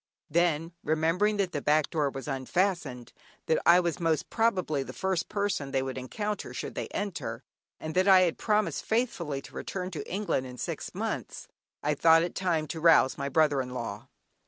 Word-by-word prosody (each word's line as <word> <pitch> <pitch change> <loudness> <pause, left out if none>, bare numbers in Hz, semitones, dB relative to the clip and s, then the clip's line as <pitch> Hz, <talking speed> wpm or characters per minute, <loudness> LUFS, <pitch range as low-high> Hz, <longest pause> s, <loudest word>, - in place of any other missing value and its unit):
Then, 165 0 +1
remembering 165 +7 +1
that 195 -3 0
the 145 - -3
back 150 +1 +2
door 150 -4 +1
was 135 +1 -7
unfastened, 135 -2 -1 0.3
that 160 - +2
I 170 +1 +8
was 170 -2 -1
most 165 -3 0
probably 185 -10 +1
the - - -7
first 190 -3 -1
person 200 -9 -1
they 135 -1 0
would 130 -1 -4
encounter 205 +11 -4
should - - -5
they - - -4
enter, 200 -2 -4 0.4
and 155 0 -5
that 185 +3 +2
I 190 -1 +8
had 175 -3 +1
promised 210 -1 +1
faithfully 175 - -1
to - - -13
return 185 -1 -4
to 150 -5 -6
England 190 -9 -1
in 125 0 -10
six - - -5
months, - - -4 0.4
I 150 - +2
thought 165 +2 +5
it 175 - -3
time 170 -4 0
to 160 - -5
rouse 165 -5 +5
my 140 0 -3
brother 150 -1 +3
in 125 0 -6
law. 115 0 -5
165 Hz, 185 wpm, -29 LUFS, 140-185 Hz, 0.4 s, I